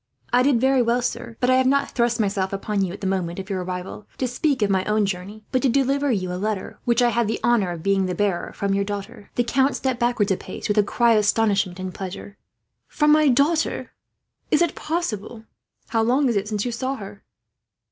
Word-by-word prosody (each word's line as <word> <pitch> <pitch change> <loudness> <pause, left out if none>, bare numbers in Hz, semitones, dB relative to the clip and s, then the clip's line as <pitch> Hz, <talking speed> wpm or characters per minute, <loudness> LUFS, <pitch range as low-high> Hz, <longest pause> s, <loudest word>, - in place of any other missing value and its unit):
"I 245 - +5
did 260 -2 +3
very 265 +1 +3
well, 240 +1 +1
sir; 235 -2 -4
but 250 +1 +2
I 255 - +5
have 260 0 +3
not 280 +1 +2
thrust 235 -1 +1
myself 195 -2 0
upon 195 0 -1
you, 185 - -2
at 195 - -9
the - - -4
moment 185 -3 -1
of 190 +1 -6
your 185 -2 -2
arrival, 180 +3 -6
to 255 - -1
speak 260 0 0
of 205 - +1
my 190 -1 +2
own 210 0 +2
journey; 195 +3 -5
but 255 - +1
to 270 - +2
deliver 275 +2 +1
you 185 -5 -1
a 180 - -4
letter, 210 -2 -3
which 240 0 +3
I 240 - +4
have 235 -1 +1
the 225 - -2
honour 235 -6 +3
of 170 -2 -6
being 195 -1 +2
the 180 - -2
bearer, 200 -4 -1
from 200 -1 -1
your 200 0 +1
daughter." 200 0 -7
The 245 - +2
count 265 +3 +1
stepped 260 -2 -1
backwards 240 -4 +1
a 190 - +2
pace, 185 - -7
with 210 0 +2
a - - +5
cry 235 +3 +2
of 215 - +4
astonishment 205 -3 +1
and 185 -1 -5
pleasure. 195 +1 -7 0.5
"From 300 0 +2
my 305 0 +5
daughter! 285 +5 +1 0.6
Is 305 - +4
it 340 - 0
possible, 245 - -3
sir? 220 - -28 0.4
How 225 -1 +1
long 255 +4 +2
is 235 - 0
it 200 +1 0
since 210 0 -2
you 245 - -1
saw 260 +3 -2
her?" 200 -4 -10
220 Hz, 240 wpm, -23 LUFS, 195-255 Hz, 0.6 s, I